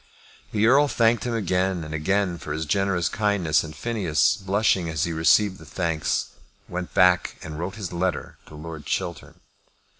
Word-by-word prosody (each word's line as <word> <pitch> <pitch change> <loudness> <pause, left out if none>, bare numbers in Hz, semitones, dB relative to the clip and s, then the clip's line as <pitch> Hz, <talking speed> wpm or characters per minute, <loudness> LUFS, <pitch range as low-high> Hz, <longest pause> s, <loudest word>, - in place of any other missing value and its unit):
The 105 0 +2
Earl 140 +5 +5
thanked 115 -4 +2
him 120 -1 -1
again 95 -3 0
and 80 0 -7
again 90 +2 0
for 75 - -5
his 80 +1 -3
generous 95 0 +1
kindness; 100 -7 +1
and 75 -1 -9
Phineas, 95 -3 +1
blushing 95 -3 +1
as 80 -1 -1
he 85 -3 -1
received 95 +5 +3
the - - -12
thanks, 85 -4 -1 0.4
went 90 0 -6
back 90 -1 +3
and 75 0 -7
wrote 90 +3 -4
his 100 -6 -6
letter 90 +1 -2
to 75 - -12
Lord 80 0 -8
Chiltern. - - -4
90 Hz, 170 wpm, -24 LUFS, 80-100 Hz, 0.4 s, Earl